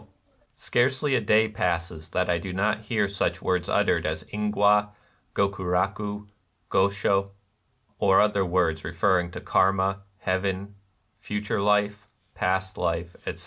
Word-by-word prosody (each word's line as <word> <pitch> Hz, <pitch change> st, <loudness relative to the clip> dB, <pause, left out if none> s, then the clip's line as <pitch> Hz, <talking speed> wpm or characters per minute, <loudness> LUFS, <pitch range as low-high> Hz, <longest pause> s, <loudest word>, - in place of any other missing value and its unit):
The -, -, -20 dB
1 -, -, -33 dB, 0.4 s
Scarcely 130 Hz, +3 st, +1 dB
a 125 Hz, -, +3 dB
day 110 Hz, +1 st, +4 dB
passes 85 Hz, -6 st, -3 dB
that 90 Hz, 0 st, 0 dB
I 85 Hz, -1 st, +1 dB
do 95 Hz, +2 st, -6 dB
not 105 Hz, +3 st, 0 dB
hear 105 Hz, -2 st, +1 dB
such 100 Hz, 0 st, -1 dB
words 90 Hz, -1 st, 0 dB
ut -, -, +3 dB
tered -, -, +1 dB
as -, -, -3 dB
ingwa, 105 Hz, 0 st, +2 dB, 0.5 s
gokurakti, 100 Hz, +2 st, -1 dB, 0.5 s
gosho, 100 Hz, 0 st, +2 dB, 0.3 s
— 115 Hz, -3 st, -42 dB
or 95 Hz, -1 st, +5 dB
other 105 Hz, -2 st, +3 dB
words 85 Hz, -3 st, 0 dB
referring 90 Hz, -2 st, +1 dB
to -, -, -7 dB
Karma, 95 Hz, +1 st, +2 dB, 0.2 s
heaven, 95 Hz, +1 st, -2 dB, 0.5 s
future 105 Hz, -1 st, -2 dB
life, 105 Hz, 0 st, +1 dB, 0.2 s
past 95 Hz, +1 st, -1 dB
life, 85 Hz, +1 st, -1 dB
etc. -, -, -4 dB
100 Hz, 145 wpm, -26 LUFS, 95-105 Hz, 0.5 s, or